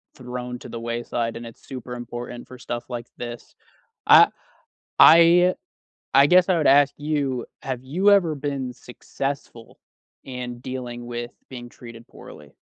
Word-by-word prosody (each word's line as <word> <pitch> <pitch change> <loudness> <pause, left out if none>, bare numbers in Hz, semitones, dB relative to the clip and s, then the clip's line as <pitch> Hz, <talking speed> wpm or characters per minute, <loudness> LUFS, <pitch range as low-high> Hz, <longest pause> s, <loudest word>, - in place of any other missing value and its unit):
thrown 125 -1 -7
to - - -11
the 115 - -6
wayside, 115 0 -3
and 120 - -9
it's 115 - -15
super 125 -2 -7
important 120 0 -8
for 130 - -12
stuff 120 0 -5
like 120 -1 -6
this. 120 -1 -8 0.5
I - - +8 0.7
I 170 +2 +7 0.6
I 135 +1 +7
guess 180 +4 +5
I 185 - +3
would 155 - 0
ask 140 +1 +5
you, 145 -4 -2 0.2
have 130 -1 -5
you 180 +10 +2
ever 180 -6 +4
been 140 -3 -4
successful 125 -1 -7 0.5
in 125 -2 -7
dealing 125 -2 -7
with 120 0 -5 0.2
being 120 -2 -9
treated 115 -1 -13
poorly? - - -14
125 Hz, 145 wpm, -23 LUFS, 120-145 Hz, 0.7 s, I